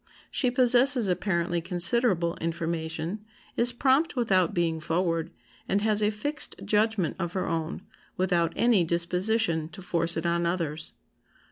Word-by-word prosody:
She 255 - +1
possesses 250 -1 +5
apparently 175 -2 -1
considerable 175 0 +2
information, 165 +3 -4 0.3
is 245 +1 +3
prompt 270 +6 +1
without 190 -8 +2
being 165 -2 -1
forward, 165 0 -1 0.4
and 200 +2 0
has 215 -1 +1
a 210 - +2
fixed 285 +9 -3
judgment 210 -5 0
of 170 -1 -3
her 190 - -2
own, 165 +2 -3 0.3
without 175 -3 +1
any 230 -6 +3
disposition 170 0 0
to 195 - -11
force 170 -2 +1
it 165 - -3
on 170 0 0
others. 165 -3 -3
180 Hz, 135 wpm, -26 LUFS, 170-220 Hz, 0.4 s, possesses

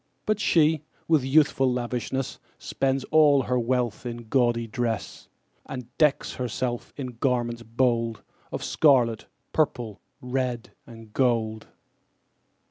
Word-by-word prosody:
But 215 -1 +1
she, 160 -5 +3 0.3
with 160 -5 +3
youthful 135 -1 +3
lavishness, 125 +2 -3 0.2
Spends 135 0 -1
all 150 -3 +5
her 125 +1 0
wealth 120 -2 -1
in 120 -2 -7
gaudy 120 -2 +2
dress, 115 -2 -3 0.4
And 125 -1 -8
decks 150 -2 +2
herself 125 -1 -3
in 125 -4 -6
garments 120 -3 0
bold 115 -1 0 0.3
Of - - -4
scarlet, 125 -7 +3 0.3
purple, 120 -9 -1 0.2
red, 125 -2 -3 0.2
and 115 -2 -13
gold. 115 -4 0
125 Hz, 115 wpm, -26 LUFS, 115-135 Hz, 0.4 s, all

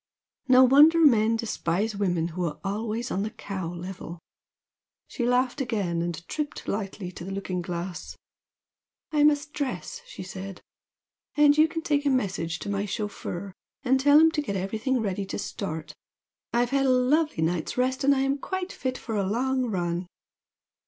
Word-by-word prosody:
No 255 0 +7
wonder 290 +6 +7
men 230 -8 +5
despise 215 -2 -1
women 175 -4 0
who 180 +2 -4
are 150 -3 -4
always 220 +4 -3
on 195 - 0
the 210 - -2
cow 195 -6 -5
level!" 175 -1 -7 0.9
She 240 -3 -2
laughed 250 +2 +1
again, 200 -9 -1
and 170 -1 -4
tripped 300 -1 -4
lightly 195 -2 -4
to 175 - -9
the 185 - -6
looking 190 -2 -3
glass. 175 0 -5 0.9
"I 300 -1 +3
must 295 0 +3
dress;" 295 - -4
she 345 - -8
said 190 0 -7 0.8
"And 295 -1 +6
you 310 +1 +5
can 325 0 -5
take 290 -3 +1
a 285 - +2
message 185 -10 -1
to - - -6
my 200 0 -1
chauffeur 200 -2 -5 0.3
and 265 0 +3
tell 290 +2 +6
him 320 0 +6
to 310 - -1
get 200 -9 -4
everything 220 +7 -1
ready 195 -2 -2
to - - -4
start. 160 -5 -5 0.6
I've 240 +1 +1
had 275 -1 +2
a - - +3
lovely 255 - +2
night's 165 +4 -1
rest 255 +1 0
and 280 +1 +5
am 270 +1 0
quite 375 +4 -4
fit 255 -1 -3
for 225 - -5
a 200 - +1
long 255 +3 0
run." 175 -3 -2
220 Hz, 170 wpm, -26 LUFS, 185-270 Hz, 0.9 s, No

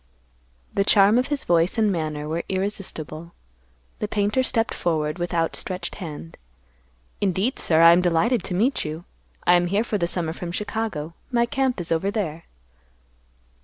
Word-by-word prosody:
The 200 - +2
charm 205 +3 +5
of 255 - 0
his 290 -2 -2
voice 170 +4 +2
and 215 -2 +3
manner 155 -4 -3
were 165 +2 -2
irresistible. 180 -4 -3 0.7
The 210 - -2
painter 205 +4 +1
stepped 230 -3 +1
forward 155 -1 -1
with 175 0 -2
outstretched 170 +2 -2
hand, 150 - -8 0.8
"Indeed, 200 +6 0
sir; 160 -1 +3
I 165 - +10
am 175 +1 +5
delighted 180 +6 +2
to 180 - -2
meet 235 +9 +1
you. 155 +3 -6 0.4
I 175 - +6
am 175 0 +3
here 200 +5 +1
for 215 -3 -2
the 170 - +1
summer 170 -2 -2
from 175 0 -6
Chicago. 205 -6 -3 0.2
My 235 -1 +3
camp 265 -2 0
is 175 0 -4
over 165 +4 +1
there." 170 -7 -3
180 Hz, 165 wpm, -24 LUFS, 165-210 Hz, 0.8 s, I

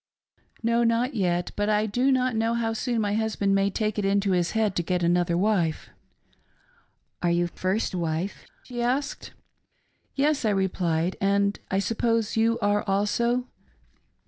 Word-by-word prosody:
" - - -35
No, 235 +1 +2
not 235 +3 +1
yet, 175 -5 0
but 205 0 0
I 210 0 +2
do 245 +6 +1
not 255 -2 +1
know 225 +1 +1
how 225 -1 -1
soon 235 0 -1
my 205 -1 0
husband 215 -2 0
may 195 0 +2
take 215 +1 -2
it - - -1
into 195 0 +1
his 175 -2 +1
head 215 -3 +1
to - - +2
get 180 +1 -1
another 175 0 +2
wife." 180 -5 0 0.7
" - - -39
Are 175 - +1
you 175 0 +2
first 185 +5 -2
wife 170 +2 -3
.''" - - -36
she 245 -1 -5
asked. 265 +4 -2 0.4
" - - -44 0.3
Yes," 290 0 +1
I 220 - +2
replied, 180 -3 0
" - - -33 0.2
and 200 0 0
I 190 - 0
suppose 230 +2 0
you 225 +1 +2
are 205 0 +2
also 235 +5 +1
205 Hz, 175 wpm, -26 LUFS, 185-230 Hz, 0.7 s, No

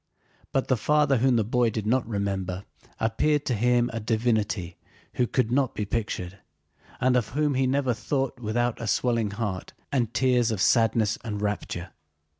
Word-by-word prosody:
But 135 - 0
the 130 - +2
father 145 +3 +3
whom 130 +1 +3
the 115 - +3
boy 120 +2 +2
did 110 -1 -4
not 120 +2 +1
remember 100 -3 -2 0.3
appeared 145 +7 +1
to 125 - 0
him 120 +2 +2
a 115 - -2
divinity 110 -5 -1 0.4
who 125 - +2
could 125 -2 0
not 135 0 +1
be 105 - -2
pictured, 100 -4 -3 0.6
and 125 0 +3
of 120 -4 +2
whom 150 -1 +2
he 130 0 +2
never 130 -1 +1
thought 135 +2 -2
without 120 +1 -1
a 115 - -3
swelling 115 -1 +1
heart 100 -3 -4 0.2
and 120 -5 0
tears 125 0 +2
of 110 -4 -2
sadness 115 0 +3
and 105 -3 -4
rapture. 100 -3 -3
115 Hz, 170 wpm, -26 LUFS, 105-125 Hz, 0.6 s, father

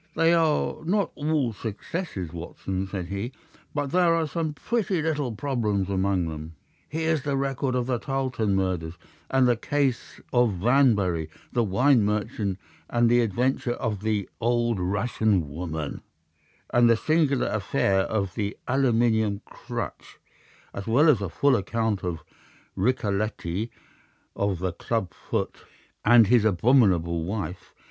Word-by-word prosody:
"They 165 +1 +4
are 160 -2 +1
not 195 +2 +1
all 145 -5 0
successes, 105 - -5
Watson," 95 +3 -4
said 95 -2 -4
he. 100 +6 -4 0.4
"But 145 -2 -1
there 175 -2 +4
are 165 -1 +1
some 155 0 -3
pretty 205 -2 -1
little 150 -5 -1
problems 105 -8 -1
among 95 -2 +1
them. 80 +1 -7 0.3
Here's 160 -1 0
the 140 -1 -1
record 135 -1 -1
of 125 -1 0
the 125 -2 -1
Tarleton 130 -7 -1
murders, 90 -4 -1 0.3
and 130 -1 +4
the 120 - +4
case 135 +1 -1
of 120 -4 +4
Vamberry, 100 - +2 0.2
the 120 - +2
wine 120 +4 +3
merchant, 105 -2 -1 0.3
and 120 -1 +3
the 120 0 +5
adventure 120 +3 0
of 110 -6 -3
the 105 -2 -1
old 120 -2 +1
Russian 100 -1 +1
woman, 80 -2 -4 0.7
and 120 -1 +5
the 115 - +5
singular 150 -2 +2
affair 100 -2 +1
of 100 -1 -1
the 100 -2 -3
aluminium 115 -5 +2
crutch, - - -7 0.6
as 100 - -6
well 140 +8 +5
as 120 -9 +4
a 100 - -2
full 140 - +3
account 110 0 -1
of 85 -3 -3 0.5
Ricoletti 105 -2 -1 0.7
of 100 -2 0
the 90 0 -2
club 105 -9 -2
foot, - - -3 0.5
and 115 0 +7
his 120 +1 +4
abominable 95 -6 +3
wife. 95 0 -5
115 Hz, 140 wpm, -26 LUFS, 95-135 Hz, 0.7 s, and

